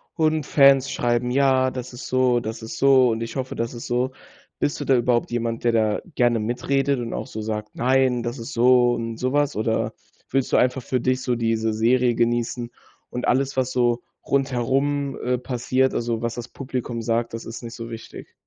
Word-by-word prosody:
und 155 Hz, -1 st, +1 dB
Fans 135 Hz, -2 st, +5 dB
schreiben. 120 Hz, 0 st, 0 dB
Ja, 130 Hz, 0 st, +3 dB
das 125 Hz, -1 st, -7 dB
ist 125 Hz, -, -8 dB
so. 130 Hz, -1 st, +2 dB
Das 110 Hz, 0 st, -6 dB
ist 110 Hz, -, -7 dB
so. 130 Hz, -2 st, +5 dB
Und 115 Hz, +1 st, -2 dB
ich 115 Hz, 0 st, -5 dB
hoffe, 130 Hz, -1 st, -3 dB
das 115 Hz, +1 st, -3 dB
ist 115 Hz, -, -7 dB
so. 125 Hz, +2 st, 0 dB, 0.5 s
Bist 145 Hz, -, -1 dB
du 145 Hz, -, -4 dB
da 135 Hz, -, +4 dB
überhaupt 120 Hz, 0 st, +1 dB
jemand, 115 Hz, -1 st, -2 dB
der 120 Hz, -, +3 dB
da 110 Hz, -2 st, +1 dB
gerne 120 Hz, -2 st, +3 dB
mitredet 135 Hz, +5 st, 0 dB
und 115 Hz, -1 st, -4 dB
auch -, -, -4 dB
so 110 Hz, -, -6 dB
sagt: 105 Hz, 0 st, -4 dB
„Nein, 130 Hz, -1 st, +2 dB
das 120 Hz, +2 st, -4 dB
ist 115 Hz, +4 st, -7 dB
so 120 Hz, 0 st, +4 dB
und 115 Hz, -1 st, -4 dB
sowas.“ 140 Hz, +3 st, 0 dB
Oder 110 Hz, 0 st, -1 dB, 0.4 s
willst 135 Hz, -1 st, 0 dB
du -, -, +4 dB
einfach 125 Hz, +1 st, +2 dB
für 125 Hz, +1 st, -1 dB
dich 130 Hz, +1 st, 0 dB
so 125 Hz, -2 st, 0 dB
diese 115 Hz, -1 st, 0 dB
Serie 120 Hz, +2 st, +2 dB
genießen 120 Hz, +1 st, -1 dB, 0.4 s
und 125 Hz, -, -3 dB
alles, 135 Hz, +2 st, +1 dB
was 130 Hz, -1 st, 0 dB
so 120 Hz, -1 st, +1 dB, 0.2 s
rundherum, 135 Hz, +1 st, 0 dB
äh, 125 Hz, 0 st, +1 dB
passiert. 130 Hz, +1 st, 0 dB
Also, 115 Hz, -1 st, -2 dB
was 115 Hz, 0 st, -1 dB
das 120 Hz, -1 st, -6 dB
Publikum 125 Hz, -3 st, -4 dB
sagt, 115 Hz, 0 st, -1 dB
das 115 Hz, -, -7 dB
ist 115 Hz, -, -7 dB
nicht 115 Hz, 0 st, -8 dB
so 115 Hz, 0 st, -7 dB
wichtig? 115 Hz, -, -9 dB
120 Hz, 200 wpm, -23 LUFS, 115-130 Hz, 0.5 s, Fans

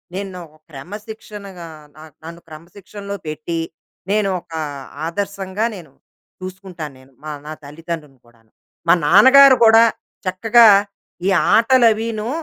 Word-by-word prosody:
నేను 190 Hz, -2 st, -6 dB, 0.3 s
క్రమశిక్షణగా 200 Hz, +3 st, -10 dB, 0.3 s
న -, -, -16 dB, 0.2 s
నన్ను 170 Hz, +1 st, -10 dB
క్రమశిక్షణలో 200 Hz, +5 st, -10 dB
పెట్టి, 155 Hz, +2 st, -4 dB, 0.5 s
నేను 210 Hz, -2 st, +1 dB
ఒక 165 Hz, -, -32 dB, 0.6 s
ఆదర్శంగా, 200 Hz, +3 st, -3 dB
నేను 165 Hz, -7 st, -13 dB, 0.5 s
చూసుకుంటాను 185 Hz, -5 st, -8 dB
నేను, 130 Hz, +1 st, -21 dB, 0.4 s
నా 155 Hz, -, -6 dB
తల్లిదండ్రులను 150 Hz, -2 st, -8 dB
కూడాను. 115 Hz, -2 st, -27 dB, 0.4 s
మా -, -, +6 dB
నాన్నగారు 260 Hz, -, +7 dB
కూడా 225 Hz, +1 st, +7 dB, 0.4 s
చక్కగా 225 Hz, +5 st, +4 dB, 0.6 s
ఈ -, -, +3 dB, 0.3 s
ఆటలవిను, 230 Hz, -2 st, +2 dB
190 Hz, 100 wpm, -19 LUFS, 165-215 Hz, 0.6 s, నాన్నగారు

